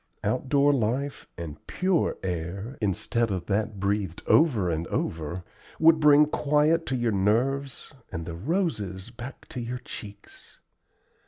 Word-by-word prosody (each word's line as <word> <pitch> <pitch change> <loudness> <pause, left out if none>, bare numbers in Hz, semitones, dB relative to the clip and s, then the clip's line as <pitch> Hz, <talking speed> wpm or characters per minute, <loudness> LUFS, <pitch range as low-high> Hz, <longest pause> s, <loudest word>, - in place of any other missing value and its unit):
Outdoor 140 +3 +2
life 135 +3 -1
and 85 -4 -7
pure 185 -2 +1
air, 95 +7 -4
instead 110 +3 0
of 95 -3 -3
that 105 +1 -1
breathed 100 -3 -1
over 125 - +4
and 80 -1 -1
over, 80 +3 -3 0.3
would 160 0 +6
bring 150 0 +7
quiet 150 +2 +2
to 130 - 0
your 120 -2 +1
nerves 125 +8 0 0.2
and 80 0 -4
the 85 - -5
roses 105 - -2
back 120 +2 -9
to - - -5
your 120 +2 -4
cheeks. 105 -4 -10
115 Hz, 135 wpm, -27 LUFS, 95-140 Hz, 0.3 s, bring